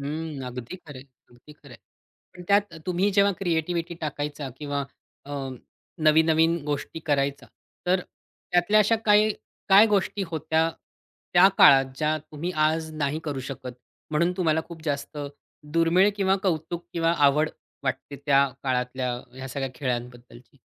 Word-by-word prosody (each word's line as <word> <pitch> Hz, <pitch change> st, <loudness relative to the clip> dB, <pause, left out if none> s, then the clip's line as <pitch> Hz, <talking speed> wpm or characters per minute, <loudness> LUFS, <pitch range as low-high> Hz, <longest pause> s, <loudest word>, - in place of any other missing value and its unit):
हं 150 Hz, 0 st, -5 dB
अगदी 125 Hz, +6 st, -7 dB
खरंय. 145 Hz, -7 st, -12 dB, 0.3 s
अगदी 120 Hz, +5 st, -17 dB
खरंय. 140 Hz, -4 st, -15 dB, 0.6 s
पण 180 Hz, -, -10 dB
त्यात 200 Hz, -3 st, +2 dB
तुम्ही 185 Hz, +3 st, +1 dB
जेव्हा 200 Hz, 0 st, +4 dB
क्रिएटिव्हिटी 170 Hz, -1 st, -1 dB
टाकायचा 145 Hz, -1 st, -4 dB
किंवा 145 Hz, -1 st, -3 dB, 0.5 s
अ, 145 Hz, -, -10 dB, 0.7 s
नवीन-नवीन 160 Hz, +2 st, +4 dB
गोष्टी 150 Hz, +2 st, -3 dB
करायचा 140 Hz, -1 st, 0 dB, 0.4 s
तर 180 Hz, +1 st, +3 dB
त्यातल्या 180 Hz, +3 st, 0 dB
अशा 220 Hz, +2 st, +3 dB
काही 210 Hz, +1 st, +5 dB, 0.4 s
काय 200 Hz, +3 st, +8 dB
गोष्टी 205 Hz, -1 st, 0 dB
होत्या? 160 Hz, +1 st, +1 dB, 0.6 s
त्या 180 Hz, +2 st, +8 dB
काळात 135 Hz, -1 st, +8 dB
ज्या 155 Hz, +2 st, +1 dB
तुम्ही 155 Hz, +3 st, -6 dB, 0.2 s
आज 160 Hz, 0 st, -1 dB
नाही 150 Hz, 0 st, -1 dB
करू 145 Hz, -3 st, -3 dB
शकत. 130 Hz, -1 st, -7 dB, 0.4 s
म्हणून 170 Hz, +4 st, +2 dB
तुम्हाला 160 Hz, -3 st, +2 dB
खूप 165 Hz, -2 st, -10 dB
जास्त 145 Hz, 0 st, -3 dB, 0.5 s
दुर्मिळ 165 Hz, +4 st, +4 dB
किंवा 195 Hz, -1 st, +2 dB
कौतुक 170 Hz, -1 st, -2 dB
किंवा 165 Hz, 0 st, +1 dB
आवड 150 Hz, +3 st, +2 dB, 0.3 s
वाटते 135 Hz, +2 st, -3 dB
त्या 140 Hz, -1 st, +5 dB, 0.2 s
काळातल्या 125 Hz, -1 st, -1 dB, 0.2 s
ह्या, 130 Hz, +1 st, -7 dB
सगळ्या 135 Hz, +1 st, -3 dB
खेळांबद्दलची? 120 Hz, -1 st, -6 dB
155 Hz, 135 wpm, -25 LUFS, 140-175 Hz, 0.7 s, काय